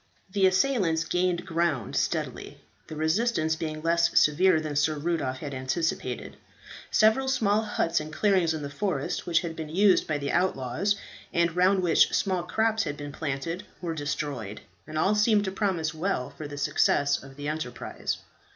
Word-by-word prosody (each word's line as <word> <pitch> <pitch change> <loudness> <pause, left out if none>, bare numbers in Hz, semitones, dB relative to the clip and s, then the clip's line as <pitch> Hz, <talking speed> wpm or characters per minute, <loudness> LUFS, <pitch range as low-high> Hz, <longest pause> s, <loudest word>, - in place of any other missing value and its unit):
The 195 -1 +4
assailants 185 -5 +2
gained 180 +1 0
ground 165 -6 -1
steadily, - - -2 0.3
the 155 - -7
resistance 160 +1 +1
being 155 -1 -5
less 170 +1 +3
severe 160 +3 +4
than 155 -2 -4
Sir 150 +2 +2
Rudolph 150 -4 -2
had 140 0 -6
anticipated. 130 -1 -3 0.5
Several 220 +5 +3
small 215 -5 +2
huts 170 -6 0
and 155 0 -7
clearings 185 -2 +2
in 155 - -5
the 140 - -4
forest 145 -3 -2
which 165 -1 +3
had 165 -3 -5
been 160 -2 -6
used 190 +3 +4
by 155 - 0
the 140 -1 -3
outlaws, 175 +2 0 0.4
and 170 0 +1
round 185 +1 +3
which 175 - +4
small 185 -3 +1
crops 220 +5 +1
had 145 - -4
been 145 0 -6
planted, 160 +4 -4 0.2
were 170 -2 -3
destroyed, 145 -8 -4 0.3
and 155 - -5
all 190 +6 +3
seemed 210 -1 +3
to 190 - -2
promise 185 -6 -1
well 160 -5 -2
for 155 - -8
the 145 0 -8
success 140 0 +2
of 135 0 -13
the 145 +1 -6
enterprise. 150 -5 -4
165 Hz, 170 wpm, -27 LUFS, 145-190 Hz, 0.5 s, The